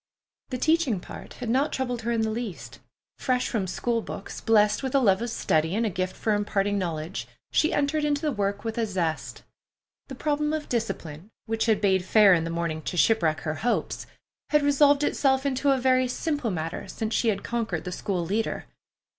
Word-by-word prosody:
The 255 - -3
teaching 310 - +2
part - - -10
had 245 - -7
not 275 +5 +2
troubled 250 -2 -2
her 235 +1 -2
in 230 -1 +1
the 220 0 0
least. 220 -5 -6 0.4
Fresh 250 -2 +1
from 205 -6 -1
school 230 +5 -1
books, - - -7
blest 210 -2 +3
with 265 0 -2
a - - +6
love 200 -5 +3
of 235 - -2
study 160 -6 +1
and 230 +2 +1
a 215 - 0
gift 185 +1 -2
for 220 - 0
imparting 205 -1 0
knowledge, 165 -1 -4 0.2
she 315 - +3
entered 290 +2 +1
into 295 -1 +1
the 300 - +1
work 205 -3 -2
with 225 0 -3
a 225 - +1
zest. 170 -5 -3 0.6
The 265 - -7
problem 300 +2 0
of 310 -1 -3
discipline, 175 -7 -4 0.2
which 225 +1 -1
had 220 -2 +3
bade 190 -3 +3
fair 200 +1 +6
in 165 -2 +2
the - - -3
morning 165 -2 -2
to 175 - -4
shipwreck 165 -6 +3
her 155 - -2
hopes, 245 - -1 0.4
had 300 -1 +3
resolved 285 0 +4
itself 265 -2 +2
into 280 +1 +1
a 270 - +4
very 255 0 +3
simple 290 -1 -2
matter 165 -3 -4
since 220 0 -4
she 235 - +1
had 200 -3 0
conquered 225 -8 -2
the 180 - -5
school 180 -1 -2
leader. 215 +6 -2
225 Hz, 200 wpm, -26 LUFS, 190-265 Hz, 0.6 s, a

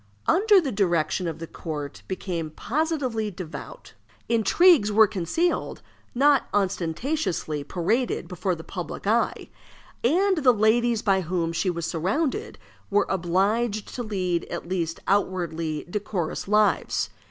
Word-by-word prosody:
Under 415 +3 +4
her 275 - -2
direction 175 -3 +1
the 165 - -6
court 150 -3 -6
became 175 -4 -3
positively 255 - -1
devout. 185 - -9 0.3
Intrigues 235 - +4
were 220 +1 +7
concealed, 210 - -1 0.3
not 280 +1 +4
ostentatiously 185 - -1
paraded 205 - -1
before 180 0 -2
the 160 - -10
public 180 +2 -6
eye; 225 +3 0 0.5
and 375 +9 +3
the 260 -4 +5
ladies 225 +2 +2
by 195 -3 +3
whom 170 -1 -1
she 185 +3 0
was 170 -2 -2
surrounded 235 - -1 0.3
were 205 0 +3
obliged 200 +5 0
to 250 - -4
lead 185 -6 -1
at - - -6
least 170 -3 -2
outwardly 170 -6 -1
decorous 190 -4 -3
lives. 210 +1 +2
200 Hz, 120 wpm, -25 LUFS, 170-240 Hz, 0.5 s, were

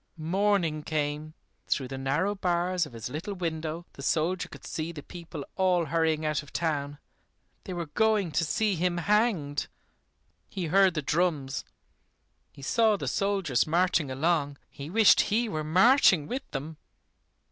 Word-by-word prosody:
Morning 170 -1 +1
came! 150 0 -3 0.3
Through 130 -2 -1
the 135 - -5
narrow 150 +10 0
bars 180 -2 0
of 130 - -16
his 115 -2 -6
little 160 +10 -5
window 165 -1 -4
the - - -11
soldier 165 +5 0
could - - -12
see 165 0 -4
the 150 -4 -9
people 165 -5 -8
all 180 -3 +2
hurrying 160 0 0
out 155 -1 0
of 145 - -15
town. 145 -3 -2 0.7
They 185 - -5
were 175 -1 -3
going 210 +2 +1
to 165 - +1
see 210 +6 +1
him 175 0 0
hanged. 175 - +1 0.8
He 185 - -4
heard 190 +2 +4
the 155 - -2
drums, 150 -4 0 0.9
he 140 - -14
saw 220 +7 +3
the - - -5
soldiers 195 -11 +1
marching 170 -2 +2
along. 145 +1 0
He 140 +2 -8
wished 220 +3 +6
he 230 +3 +1
were 155 -7 -3
marching 185 - +5
with 260 - -5
them. 150 +3 -6
165 Hz, 155 wpm, -28 LUFS, 150-185 Hz, 0.9 s, wished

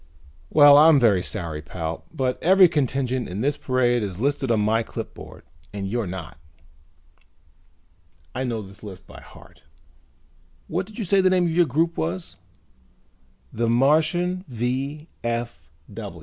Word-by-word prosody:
"Well, 145 -1 +7
I'm 155 -1 +7
very 105 -7 +3
sorry, 85 -6 -4
pal, 80 +1 -6
but 130 -5 -2
every 190 +1 +6
contingent 130 -5 -1
in 95 +4 -4
this 145 +3 0
parade 120 -2 +1
is 95 -3 -5
listed 140 +1 -1
on 115 -2 +2
my 110 +2 +2
clipboard - - -9 0.3
and 100 -1 -5
you're 115 0 -2
not. 90 -5 -8 1.9
I 130 - -3
know 115 -4 -3
this 100 0 -15
list 95 -3 -10
by - - -13
heart. - - -17 1.1
What 180 +3 -3
did 215 - -14
you 220 - -3
say 195 +2 +3
the 185 - +4
name 185 -1 +2
of 170 - 0
your 170 0 +3
group 165 +6 0
was?" 85 +2 -4 1.2
"The 115 0 -1
Martian 160 +8 +2
V. 135 +5 -3
130 Hz, 140 wpm, -23 LUFS, 105-155 Hz, 1.9 s, Well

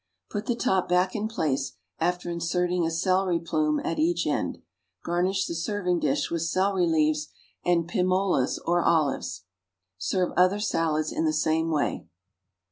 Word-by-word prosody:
Put 205 +1 -4
the 240 - +1
top 190 -6 +1
back 180 +1 +2
in 215 0 -1
place, 155 -11 -1 0.3
after 175 +1 -1
inserting 175 +1 0
a - - 0
celery 185 +1 +1
plume 155 -2 0
at 165 - -2
each 170 +2 +1
end. 150 - -1 0.5
Garnish 185 +3 0
the - - -4
serving 180 +1 -1
dish - - 0
with 170 -1 -1
celery 185 +2 +1
leaves 155 -1 +2 0.4
and 170 -2 +2
pim 180 +1 0
olas 185 -8 +1
or 175 +1 +2
olives. 140 - +1 0.6
Serve 180 - 0
other 185 +3 +4
salads 160 -7 0
in 160 - -1
the 155 - +3
same 160 +1 +1
way. 150 - -1
170 Hz, 155 wpm, -26 LUFS, 160-185 Hz, 0.6 s, other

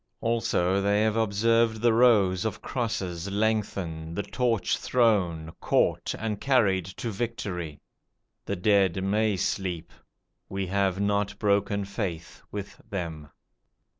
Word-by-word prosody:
Also 100 -5 +1
they 100 +2 +2
have 110 -1 +1
observed 115 +1 +2
the 120 -1 +4
rows 105 -6 +4
of 110 -4 -3
crosses 100 -7 -3
lengthen, 100 -6 -1
the 100 - -1
torch 115 -5 0
thrown, 90 -10 +1
caught, - - +1
and 105 -2 -3
carried 105 -10 +3
to 100 +5 -5
victory. 95 -8 -4 0.7
The 100 - -2
dead 95 -1 +2
may 105 +1 +1
sleep. 90 -3 -2 0.6
We 95 0 -2
have 95 0 0
not 100 0 0
broken 100 -1 +1
faith 95 -4 -5
with 100 -1 -7
them. 80 -7 -5
100 Hz, 120 wpm, -27 LUFS, 90-110 Hz, 0.7 s, the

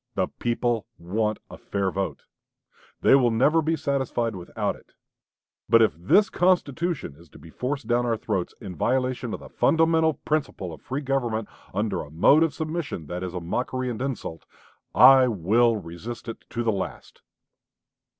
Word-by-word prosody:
The - - +1
people 120 -1 0
want 105 +5 -1
a - - -10
fair 100 -2 -2
vote. 95 +1 -3 0.8
They - - +5
will 130 -3 +5
never 140 +8 +3
be 160 +1 0
satisfied 130 -6 -1
without 90 -2 -3
it.... - - -21 0.8
But 115 0 +7
if 110 - +2
this 100 - +4
constitution 175 - 0
is 85 +2 -18
to - - -15
be 80 - -14
forced 135 - -3
down 120 +1 +1
our 115 -1 +1
throats 100 -5 -3
in 95 -6 -8
violation 125 - 0
of - - -5
the - - -11
fundamental 160 -1 +3
principle 135 - -3
of - - -12
free 135 +3 -4
government, 120 -6 -1 0.2
under 100 -2 -1
a 75 - -9
mode 90 - +5
of 165 -2 +3
submission 155 - -4
that 90 +4 -5
is 90 -1 -5
a - - -2
mockery 125 +8 -2
and 115 - -6
insult, 120 - -5 0.5
I 135 -1 +8
will 115 +3 +2
resist 100 +8 -8
it 115 - -7
to 120 - -3
the 115 - +2
last." 95 -3 -6
120 Hz, 170 wpm, -25 LUFS, 95-135 Hz, 0.8 s, I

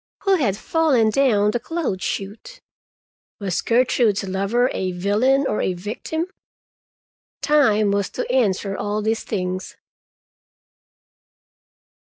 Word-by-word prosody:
Who 390 -1 +3
had 210 - 0
fallen 265 -7 +2
down 210 -5 +3
the 240 - -1
clothes 290 - -3
chute? 215 - -5 0.8
Was 190 -4 -2
Gertrude's 230 -3 +2
lover 200 +7 0
a 185 -1 -2
villain 215 +10 +2
or - - -1
a 185 - 0
victim? 220 - -4 1.2
Time 215 -9 +3
was 200 -1 0
to - - -2
answer 200 -6 +1
all 205 +1 -2
these 220 +1 -1
things. 185 -2 -4
215 Hz, 110 wpm, -21 LUFS, 200-260 Hz, 1.2 s, Who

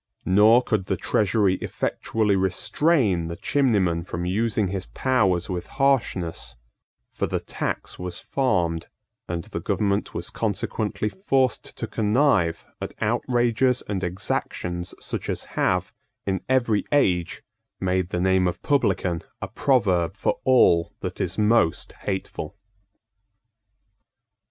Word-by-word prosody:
Nor 110 +6 +6
could 105 -6 -1
the 95 - 0
Treasury 100 0 +2
effectually 105 -3 -1
restrain 95 - +2
the 85 - -5
chimneyman 100 -13 +1
from 85 0 -4
using 105 +1 0
his 95 0 -4
powers 100 -10 +1
with 90 -2 -4
harshness: 110 - 0 0.6
for - - -2
the - - -1
tax - - -4
was 90 -1 -4
farmed; 85 -12 0 0.4
and 85 -1 -3
the - - -5
government 100 0 0
was - - -4
consequently 105 - -2
forced 130 - 0
to - - -2
connive 105 - +2 0.2
at - - -5
outrages 120 +1 +1
and 95 -2 -3
exactions 90 0 -3
such - - -5
as - - -1
have, 90 -1 0 0.3
in 95 -1 -1
every 120 -5 +2
age 90 - +1 0.4
made 95 -1 0
the 90 - -2
name 95 0 +3
of 90 0 -4
publican 95 -11 +1 0.2
a - - -4
proverb 100 - +1
for - - 0
all 85 -10 +4
that - - -4
is 90 +1 -2
most 105 -6 +2
hateful. 95 -2 -5
95 Hz, 120 wpm, -24 LUFS, 90-115 Hz, 0.6 s, Nor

